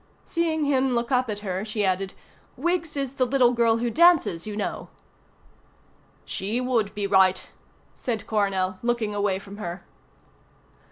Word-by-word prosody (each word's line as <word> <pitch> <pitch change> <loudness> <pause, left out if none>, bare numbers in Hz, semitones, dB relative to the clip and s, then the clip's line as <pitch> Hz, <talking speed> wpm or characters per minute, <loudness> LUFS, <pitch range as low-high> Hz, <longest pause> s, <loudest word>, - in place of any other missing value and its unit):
Seeing 320 -2 0
him 265 -2 +2
look 235 +2 -1
up 255 -2 +2
at 205 -1 -4
her 190 -1 -3
she 215 -1 -1
added, 190 +1 -1 0.4
"Wiggs 335 +1 -1
is 275 -2 -2
the 255 - +3
little 250 -1 +4
girl 230 -1 +3
who 235 0 -1
dances, 320 - +4
you 210 -1 -5
know." 210 - -4 1.4
"She 210 +5 -2
would 230 -5 0
be 205 -1 -2
right," 190 -1 +3 0.5
said 225 -4 -4
Coronel, 190 -3 0
looking 235 -3 -1
away 200 -2 0
from 200 +1 -10
her. 175 -3 -6
220 Hz, 150 wpm, -25 LUFS, 200-255 Hz, 1.4 s, little